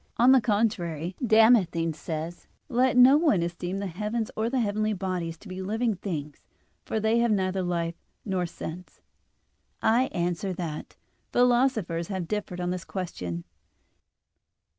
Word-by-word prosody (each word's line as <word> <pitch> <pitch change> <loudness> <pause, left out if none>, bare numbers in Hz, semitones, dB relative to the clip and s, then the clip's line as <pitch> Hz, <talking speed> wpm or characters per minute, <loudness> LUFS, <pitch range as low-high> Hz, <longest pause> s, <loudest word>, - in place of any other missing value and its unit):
On 245 +3 +6
the 265 -1 +6
contrary, 185 -7 0
Damascene 220 -8 +4
says 160 +2 -5
(De - - -26
Fide - - -25
Orth. - - -35 0.2
ii), - - -4
"Let 250 0 +3
no 255 +3 +8
one 260 - +3
esteem 175 +2 -3
the 200 - -3
heavens 210 +5 -3
or 220 +1 0
the 260 +1 0
heavenly 215 -1 0
bodies 180 -4 -3
to 210 - -15
be 185 0 -6
living 220 +4 0
things, 155 -6 -5 0.4
for 220 - -2
they 220 +2 +2
have 235 0 +3
neither 190 -2 +1
life 170 -2 -1 0.3
nor 185 -4 -1
sense." 175 +1 -8 0.8
I 235 +4 +3
answer 175 -1 -2
that, 165 -4 -6 0.3
Philosophers 240 -9 +2
have 190 -4 -3
differed 210 -3 -3
on 175 0 -1
this 180 -1 -4
question. 90 - -5
190 Hz, 160 wpm, -27 LUFS, 170-225 Hz, 0.8 s, no